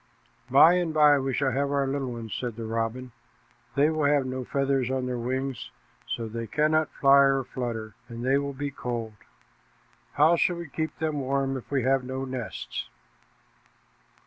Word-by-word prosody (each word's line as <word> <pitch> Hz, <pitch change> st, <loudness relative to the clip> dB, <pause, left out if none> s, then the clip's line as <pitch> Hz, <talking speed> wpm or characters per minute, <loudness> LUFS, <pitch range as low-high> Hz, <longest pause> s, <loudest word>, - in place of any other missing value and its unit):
"By 140 Hz, +6 st, +7 dB
and 175 Hz, -2 st, 0 dB
by 150 Hz, -2 st, +6 dB
we 135 Hz, 0 st, -2 dB
shall 135 Hz, 0 st, 0 dB
have 140 Hz, +2 st, 0 dB
our 140 Hz, -1 st, +1 dB
little 135 Hz, -1 st, -2 dB
ones," 115 Hz, -2 st, -7 dB
said 120 Hz, -3 st, -4 dB
the 115 Hz, 0 st, -6 dB
robin. 115 Hz, +3 st, -3 dB, 0.6 s
"They 145 Hz, +3 st, +4 dB
will 155 Hz, -2 st, 0 dB
have 145 Hz, -2 st, +3 dB
no 130 Hz, 0 st, -4 dB
feathers 135 Hz, -1 st, 0 dB
on 130 Hz, -1 st, -1 dB
their 125 Hz, -1 st, -3 dB
wings, 130 Hz, +2 st, -3 dB, 0.4 s
so 115 Hz, -1 st, -3 dB
they 115 Hz, +1 st, -5 dB
cannot 155 Hz, +5 st, +2 dB
fly 140 Hz, 0 st, +5 dB
or 135 Hz, -1 st, +4 dB
flutter; 115 Hz, -4 st, -5 dB, 0.2 s
and 120 Hz, +1 st, -6 dB
they 135 Hz, +2 st, +3 dB
will 140 Hz, 0 st, -4 dB
be 145 Hz, +1 st, -3 dB
cold. 120 Hz, -4 st, -4 dB, 1.0 s
How 155 Hz, +4 st, +4 dB
shall 175 Hz, -, +2 dB
we 170 Hz, -2 st, -7 dB
keep 160 Hz, +2 st, -4 dB
them 155 Hz, -2 st, -1 dB
warm 135 Hz, 0 st, -1 dB
if 130 Hz, -, -7 dB
we 135 Hz, -3 st, 0 dB
have 135 Hz, +1 st, +2 dB
no 130 Hz, +1 st, -4 dB
nests?" 130 Hz, -3 st, -5 dB
135 Hz, 175 wpm, -27 LUFS, 125-140 Hz, 1.0 s, By